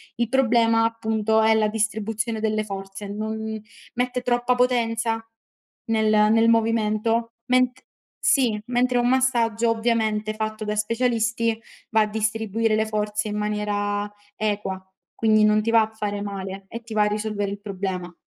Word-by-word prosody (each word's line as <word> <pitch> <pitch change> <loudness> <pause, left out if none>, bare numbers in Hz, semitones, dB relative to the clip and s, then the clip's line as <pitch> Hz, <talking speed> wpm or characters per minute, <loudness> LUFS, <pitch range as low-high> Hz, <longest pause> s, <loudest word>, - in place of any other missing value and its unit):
Il 235 -1 -1
problema, 230 -3 +3
appunto, 220 -1 +1
è 220 0 +4
la 215 -1 +3
distribuzione 220 +1 -2
delle 215 0 0
forze: 195 0 -7
non 220 +1 -4 0.4
mette 250 0 -1
troppa 245 0 +1
potenza 230 -2 +1 0.6
nel 220 -1 +1 0.2
nel 225 +1 +4
movimento. 225 0 +1
Men 255 0 +3 0.5
sì, 245 -7 +2
mentre 245 0 +1
un 240 0 +2
massaggio, 235 -3 +2
ovviamente, 220 -2 0
fatto 215 0 -4
da 210 0 -2
specialisti 230 0 0 0.3
va 220 -1 +4
a 215 - +2
distribuire 220 +1 0
le 220 0 +1
forze 210 0 -2
in 210 - -3
maniera 205 -1 -1 0.2
equa, 205 -3 -2 0.4
quindi, 215 -1 +3
non 215 0 +4
ti 230 - 0
va 230 -1 +6
a 220 0 -2
fare 205 -2 -3
male, 195 -1 -6
e 230 - -7
ti 225 -1 -9
va 210 -1 +3
a - - +3
risolvere 210 -1 -2
il 200 - -6
problema. 190 -3 -4
220 Hz, 150 wpm, -23 LUFS, 210-230 Hz, 0.6 s, va